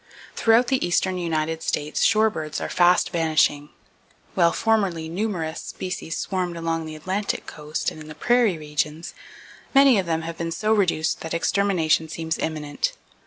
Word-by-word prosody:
Throughout 230 +2 +4
the 265 -2 +1
eastern 185 +1 +1
United 160 -1 -1
States 150 +1 -1
shorebirds 215 -9 +2
are - - -4
fast 175 0 +3
vanishing. 155 -3 +1 0.6
While 170 -3 +4
formerly 195 -8 0
numerous 170 -3 -3
species 180 -3 -5
swarmed 180 -3 -2
along 165 -1 -2
the 155 - -7
Atlantic 190 +6 -3
coast 150 0 -4
and 155 - -11
in 155 - -10
the 155 - -9
prairie 240 -5 +2
regions, 150 +1 -3 0.6
many 270 -5 +7
of 185 - -2
them 165 -1 -1
have 165 0 -6
been 165 0 -2
so 215 +6 0
reduced 170 -6 +1
that 160 0 -4
extermination 170 -3 +1
seems 160 0 -3
imminent. 150 -2 -2
165 Hz, 155 wpm, -23 LUFS, 155-195 Hz, 0.6 s, many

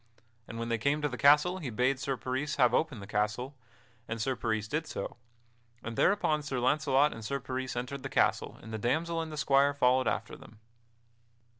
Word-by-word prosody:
And 115 - -7
when 115 0 -3
they 115 -1 0
came 140 +6 +1
to - - +3
the 130 - -5
castle 150 +7 +4
he 145 -8 -4
bade 125 +4 +1
Sir 135 0 -2
Peris 130 +4 -2
have 120 -1 +4
open 145 -4 0
the - - -8
castle; 105 +6 -1 0.5
and 115 +1 -4
Sir 130 +4 0
Peris 110 -3 -2
did 150 +5 -2
so; - - -5 0.7
and 115 0 -5
thereupon 155 - +2
Sir 140 -3 -3
Launcelot 140 +2 +3
and 115 - -9
Sir 140 +6 -2
Peris 130 0 -4
entered 125 +3 -4
the 135 - -5
castle - - +1
and 110 - -9
the 110 - -3
damsel 165 +8 0
and 160 -1 -6
the 155 - -7
squire 140 -1 +3
followed 130 -2 +3
after - - -2
them. 110 - -15
130 Hz, 200 wpm, -30 LUFS, 115-145 Hz, 0.7 s, castle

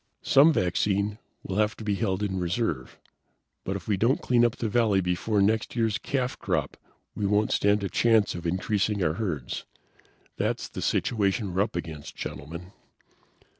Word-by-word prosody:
"Some 145 +4 +6
vaccine 100 - 0 0.2
will 95 - -4
have 105 0 +1
to - - -8
be 105 -1 0
held 100 -1 -1
in 95 -2 -1
reserve, 90 - -2 0.7
but 95 - -3
if 95 -4 -7
we 105 - +1
don't 115 +7 +2
clean 120 -1 +3
up 120 0 +2
the 115 - -2
valley 110 -3 +3
before 95 +3 +1
next 110 +3 +1
year's 115 -3 +1
calf 130 -2 -2
crop - - -1 0.4
we 100 - -1
won't 105 +1 +2
stand 100 0 +2
a - - 0
chance 110 0 +3
of 85 0 -5
increasing 100 +3 0
our 75 - +2
herds. 75 - -3 0.7
That's - - -1
the - - -6
situation 100 -3 0
we're 95 - +2
up 100 - -1
against, 80 -4 -6
Gentlemen." 85 +7 -7
100 Hz, 170 wpm, -27 LUFS, 90-110 Hz, 0.7 s, Some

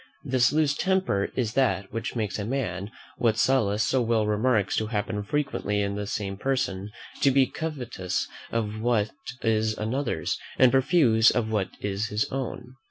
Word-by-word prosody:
This 130 -3 +3
loose 150 -1 +2
temper 185 - +1
is 115 -4 -1
that 100 -8 +1
which 115 +2 -3
makes 105 -3 -2
a - - -2
man, 100 -5 -2 0.3
what 115 -2 +2
Sallust 110 -5 +2
so 130 - +2
well 115 -2 +2
remarks 105 -1 +1
to 110 - 0
happen 105 -1 -2
frequently 105 -4 -1
in 100 0 -1
the 105 0 -4
same 100 -2 -3
person, 105 -6 -1 0.3
to 140 - +5
be 135 0 +4
covetous 125 - -3 0.2
of 110 -1 -2
what 110 -3 +1 0.3
is 110 -1 +1
another's, 115 - -2 0.2
and 130 -1 +6
profuse 130 -5 +5
of 110 -3 0
what 105 -4 0
is 100 +1 -1
his 105 +1 0
own. 130 -1 -5
110 Hz, 165 wpm, -26 LUFS, 105-130 Hz, 0.3 s, and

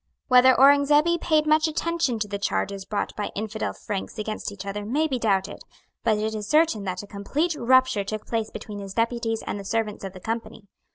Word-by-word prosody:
Whether 255 0 +7
Aurengzebe 295 +5 +5
paid 310 -2 +2
much 310 +1 +4
attention 325 -5 -1
to 210 -1 -2
the 200 0 -4
charges 200 -1 -2
brought 205 0 -3
by 210 - -3
infidel 220 +1 -3
Franks 205 -3 -6
against 215 -1 -4
each 200 -1 -9
other 205 +1 -4
may 285 +9 0
be 260 -4 -2
doubted. 195 -4 0 0.4
But 220 -2 +2
it 215 +1 -2
is 210 -1 -5
certain 305 -9 +2
that 185 +1 -3
a - - -8
complete 275 - -2
rupture 260 -4 +3
took 215 +2 -5
place 225 -2 -2
between 210 -1 -8
his 195 -1 -8
deputies 230 -1 -1
and 205 - -4
the - - -7
servants 215 0 -2
of 190 -1 -6
the 185 - -10
Company. 225 0 -5
220 Hz, 205 wpm, -25 LUFS, 205-270 Hz, 0.4 s, Whether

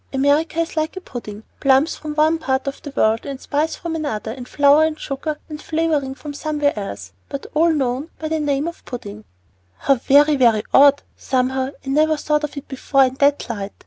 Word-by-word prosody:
America 285 +4 +1
is 330 0 -2
like 315 +3 -2
a - - -2
pudding, 225 - -8 0.2
plums 275 +4 +3
from 300 -1 -7
one 315 +2 +3
part 265 -4 -1
of 275 0 -5
the 290 - -7
world, 220 +1 +2
and 275 -2 -6
spice 305 +4 -1
from 335 -2 -5
another, 225 -9 -3
and 250 +1 -8
flour 285 +3 +5
and 315 -1 -1
sugar 295 +2 -4
and 300 -1 -8
flavoring 310 -5 -1
from 295 +1 -8
somewhere 295 -1 0
else, 100 - -6 0.2
but 280 - -6
all 330 +2 +4
known 270 0 -1
by 315 - -4
the 320 0 -1
name 290 0 0
of 340 - -7
pudding." 105 - -8 0.5
"How 275 - +3
very, 285 +4 +4
very 230 -5 +4
odd. 285 +1 +6
Somehow 260 0 -1 0.2
I - - -5
never 310 +2 +3
thought 300 0 0
of 295 0 -4
it 280 - -7
before 270 0 +2
in 255 - -2
that 285 0 +2
light. 205 -4 -5
285 Hz, 205 wpm, -20 LUFS, 260-310 Hz, 0.5 s, odd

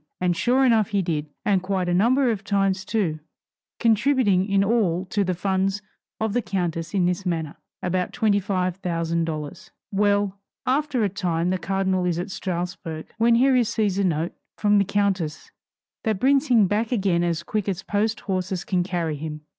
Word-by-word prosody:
And 180 -1 +1
sure 255 +8 +3
enough 225 -4 +4
he 200 -3 0
did, 155 -3 -2 0.2
and 195 -3 +3
quite 185 -1 -1
a 175 - +1
number 245 +7 +3
of 210 -2 -4
times 195 -2 0
too; 185 -9 -1 0.6
contributing 225 -4 +3
in 195 0 +3
all 195 -5 +1
to 205 - +2
the 185 -1 -1
funds 195 +2 0 0.4
of 220 -2 -1
the 245 - +1
countess 175 -4 -3
in 185 -3 +3
this 180 +2 0
manner, 165 -5 -3 0.3
about 180 0 -1
$25,000. 180 -7 -1 0.2
Well: 200 -1 +1 0.3
after 270 -2 +1
a 205 - +2
time 180 -3 -1
the 185 - -1
cardinal 190 -1 0
is 175 -2 0
at 180 +3 -4
Strasburg, 175 -3 -5
when 230 +1 +5
he 260 +4 +4
receives 220 -6 +1
a - - +2
note 165 -2 0 0.2
from 205 -1 +3
the 200 - +2
countess 195 -6 -1 0.5
that 215 -3 0
brings 275 +4 +3
him 235 -6 +5
back 210 +5 0
again 190 -7 +1
as 170 -1 -1
quick 205 +3 -2
as 190 -1 -3
post 215 +2 -1
horses 185 -1 -2
can 185 -2 +1
carry 175 -4 -2
him. 155 0 -6
195 Hz, 170 wpm, -24 LUFS, 175-210 Hz, 0.6 s, when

